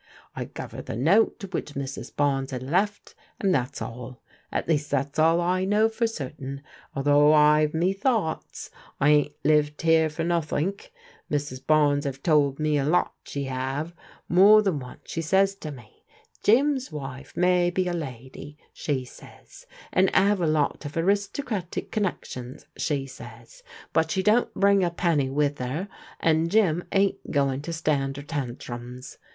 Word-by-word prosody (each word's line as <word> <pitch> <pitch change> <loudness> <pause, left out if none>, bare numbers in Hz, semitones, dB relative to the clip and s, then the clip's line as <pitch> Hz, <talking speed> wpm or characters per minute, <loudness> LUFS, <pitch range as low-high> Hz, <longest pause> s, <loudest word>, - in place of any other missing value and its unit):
I - - -4
guv - - -8
her - - -7
the - - -6
note 195 - +2
which 150 -3 -4
Mrs. 140 0 -5
Bames 135 -2 0
had 130 -2 -5
left, 195 +9 -1 0.3
and 195 -2 +2
that's 130 -1 -1
all: 125 +1 -8 0.3
at - - -2
least 150 -2 0
that's 140 +2 -1
all 165 +2 +4
I 180 +2 +1
know 210 +3 +3
for 230 +1 0
certain, 140 - -6 0.3
although 145 +2 +4
I've 150 0 +4
me 175 +4 +2
thoughts. 200 -6 -2 0.3
I 145 - +4
ain't 150 -1 +2
lived 150 0 +2
here 160 -1 +4
for 160 +2 -4
nothink. 170 - -1 0.4
Mrs. 145 -3 -3
Bames 145 -2 +3
'ave 135 -1 -4
told 140 -2 +2
me 155 -1 +1
a - - 0
lot, 165 +5 +1
she 140 -1 -4
'ave. 135 +5 -3 0.3
More 205 +5 +7
than 185 -8 0
once 125 -1 -10
she 165 - -4
says 195 +4 +3
to 155 - -7
me, 120 -7 -13 0.4
'Jim's 260 +1 +2
wife 135 -3 -8
may 180 0 +3
be 180 +1 -1
a 175 - -1
lady,' 140 -1 -7 0.2
she 135 -4 -2
says, - - -15 0.3
'and 190 +1 +4
*ave 195 -1 +3
a - - +2
lot 155 -1 0
of 145 +2 -6
aristocratic 200 +2 -1
connec 205 -5 -1
tions,' 125 0 -8
she 140 -3 -1
says, 135 - -12 0.3
'but 160 0 +2
she 190 +3 0
don't 220 +4 +3
bring 200 -1 +4
a 175 - +2
penny 165 -6 0
with 145 0 0
'er, 145 +10 -3 0.3
and 165 0 +2
Jim 180 -5 +2
ain't 195 0 +1
going 140 -2 +1
to 170 - -6
stand 145 -4 -1
'er 140 - -6
tantrums.' 125 -3 -6
155 Hz, 165 wpm, -25 LUFS, 140-185 Hz, 0.4 s, More